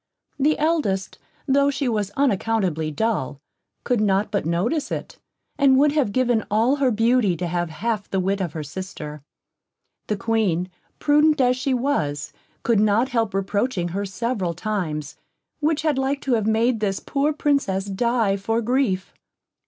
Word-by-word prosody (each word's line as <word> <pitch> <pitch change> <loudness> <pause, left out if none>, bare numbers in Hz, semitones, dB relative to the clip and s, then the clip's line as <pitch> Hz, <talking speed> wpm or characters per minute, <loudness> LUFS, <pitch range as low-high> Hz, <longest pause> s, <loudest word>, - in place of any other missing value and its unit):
The 300 +3 +3
eldest, 295 - 0 0.3
tho' 280 +1 +4
she 280 -1 -1
was 210 -4 0
unaccountably 200 - +1
dull, 155 - -1 0.4
could 245 -4 +1
not 200 0 +1
but 200 -6 -1
notice 180 - 0
it, - - -5 0.4
and 270 -2 +5
would 290 +2 +4
have 285 -8 +1
given 245 -2 +1
all 230 +7 +2
her 275 -2 +2
beauty 225 -4 +2
to 180 - -3
have 175 0 -1
half 205 +5 -3
the 195 - 0
wit 195 +2 0
of 175 -4 -3
her 155 - -4
sister. 150 -2 -7 0.9
The 210 - -1
Queen, 195 -5 0 0.3
prudent 300 +1 +3
as 250 -1 +4
she 260 +1 0
was, 155 - -1 0.3
could 230 -3 +3
not 215 +4 +3
help 225 -6 0
reproaching 195 -1 -1
her 195 +4 -3
several 195 -3 -2
times, 160 -7 -3 0.4
which 310 +1 0
had 300 -4 +1
like 270 +1 0
to 265 - 0
have 220 -3 +1
made 225 +2 +2
this 195 -2 -1
poor 285 +1 0
Princess 280 -11 0
die 210 0 +1
for 225 +4 -1
grief. 235 -6 0
220 Hz, 160 wpm, -23 LUFS, 190-260 Hz, 0.9 s, and